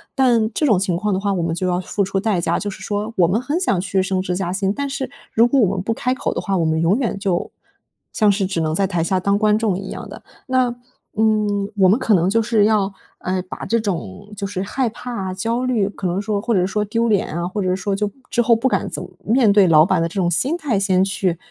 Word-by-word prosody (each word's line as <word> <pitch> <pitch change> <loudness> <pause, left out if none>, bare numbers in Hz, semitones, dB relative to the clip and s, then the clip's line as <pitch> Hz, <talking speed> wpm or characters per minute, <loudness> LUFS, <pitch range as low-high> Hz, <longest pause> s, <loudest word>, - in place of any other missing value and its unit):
但 240 -5 +3
这 305 - 0
种 215 -10 +4
情 185 -2 0
况 210 +2 -1
的 190 - 0
话 200 0 0
我 180 - -1
们 165 - -1
就 185 +1 -2
要 180 0 0
付 200 +2 -1
出 195 0 -1
代 205 -2 0
价， - - 0
就 205 - -3
是 195 - -9
说 210 +2 -3
我 175 - +5
们 210 +7 0
很 295 +6 -1
想 270 - +1
去 190 0 0
升 190 -1 -1
职 180 -1 -2
加 180 -2 -2
薪， 195 +1 0
但 280 +2 -3
是 270 -2 -4 0.2
如 230 +2 +5
果 270 +3 +2
我 200 -5 +2
们 185 - -2
不 225 - 0
开 250 +2 -1
口 - - -2
的 - - -3
话， 195 -2 -1
我 165 - +1
们 160 0 +1
永 175 +6 +3
远 235 -6 -1
就 190 -3 -1 0.6
像 210 -2 +3
是 195 0 0
只 180 -3 -2
能 155 0 -1
在 195 +2 +1
台 175 -4 -1
下 185 +3 +1
当 200 +2 +1
观 210 0 +3
众 215 -5 0
一 195 0 -7
样 - - -7
的。 - - -11 0.2
那 255 -2 +1 0.4
嗯 210 -2 +1
我 190 -2 +5
们 200 - +4
可 230 -4 +2
能 180 -1 +3
就 225 +2 +2
是 220 -2 +2
要 210 -2 +2 0.3
呃 185 0 -2
把 185 - -8
这 230 0 +1
种 180 - -5
就 200 - -4
是 195 -1 -4
害 250 +4 -1
怕 210 -5 -5
焦 230 +6 -2
虑， 230 -6 +1
可 195 -2 -4
能 180 +3 -1
说 205 -1 -2
或 235 +1 -1
者 180 -3 +2
说 210 +2 -1
丢 230 +3 0
脸 205 -8 +1
啊， 175 - -2
或 200 +3 -3
者 185 -1 +1
说 195 +1 -2
就 205 0 -2 0.2
之 240 - +1
后 235 0 +4
不 240 +4 0
敢 - - 0
怎 - - -5
么 - - -10
面 230 -1 +3
对 200 -3 +5
老 155 -1 +6
板 185 -3 +1
的 165 - 0
这 170 - -13
种 180 -3 +1
心 265 - +1
态， 285 -11 -1
先 190 -2 +2
去 185 -3 -1
200 Hz, 295 characters per minute, -20 LUFS, 185-225 Hz, 0.6 s, 老